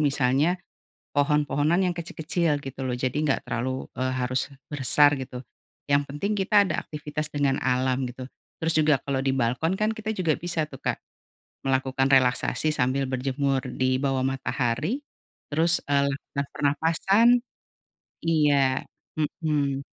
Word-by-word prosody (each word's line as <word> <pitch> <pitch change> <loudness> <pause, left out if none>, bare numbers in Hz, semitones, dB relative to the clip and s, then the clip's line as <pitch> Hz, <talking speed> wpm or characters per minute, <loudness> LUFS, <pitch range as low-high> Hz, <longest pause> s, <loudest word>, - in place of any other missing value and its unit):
misalnya, 140 +4 +2 0.6
pohon-pohonan 150 +3 +2
yang 175 - -1
kecil-kecil 160 -2 -1
gitu 135 -1 -9
loh 130 - -1
jadi 130 0 -1
enggak 140 -3 0
terlalu, 130 +2 -3
eee, 130 0 -1
harus 130 +2 -1 0.2
besar 145 +1 +4
gitu, 130 -1 -6 0.5
yang 140 0 +3
penting 145 +10 -3
kita 200 +1 +4
ada 155 - -1
aktivitas 150 0 -5
dengan 140 -2 +1
alam 130 +1 +1
gitu, 125 +1 -8 0.3
terus 165 0 +1
juga 155 -2 +4
kalau 135 -2 -2
di 135 - +1
balkon 130 +8 0
kan 215 +1 +1
kita 220 0 -3
juga 180 -7 +1
bisa 170 -2 -1
tuh 135 -3 -12
Kak, - - 0 0.7
melakukan 135 0 +1
relaksasi 130 +4 +2
sambil 135 0 +1
berjemur 135 +1 0
di 130 0 0
bawah 135 -1 0
matahari, 135 - -1 0.5
terus, 165 +2 +4
eee, 140 0 +3
lah 135 - -1 0.2
lah 140 - +1
pernapasan. 165 +9 +2 1.0
Iya, 145 -5 +3 0.6
mhm. 140 -3 0
140 Hz, 140 wpm, -25 LUFS, 130-155 Hz, 1.0 s, besar